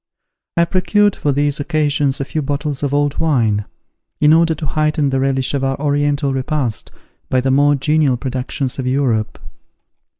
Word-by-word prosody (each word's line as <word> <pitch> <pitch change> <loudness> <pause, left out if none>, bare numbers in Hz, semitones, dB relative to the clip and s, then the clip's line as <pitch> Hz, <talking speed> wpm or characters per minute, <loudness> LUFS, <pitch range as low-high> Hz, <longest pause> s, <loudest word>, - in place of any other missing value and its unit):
I 170 - +4
procured 190 +3 +2
for 145 - -1
these 145 +1 0
occasions 145 -2 0
a 140 - -2
few 155 - -3
bottles 145 0 -3
of 140 -2 -1
old 145 0 0
wine, 115 -10 +1 0.5
in 150 +1 +5
order 165 0 +3
to 155 - -5
heighten 150 -1 0
the 135 - 0
relish 135 0 0
of 140 -1 -1
our 135 0 -1
Oriental 145 -1 0
repast 130 -4 -2 0.4
by 130 - +2
the 130 +1 0
more 145 +2 +4
genial 145 -1 +1
productions 130 +1 -4
of 130 - -2
Europe. 125 -5 0
145 Hz, 165 wpm, -18 LUFS, 135-150 Hz, 0.5 s, in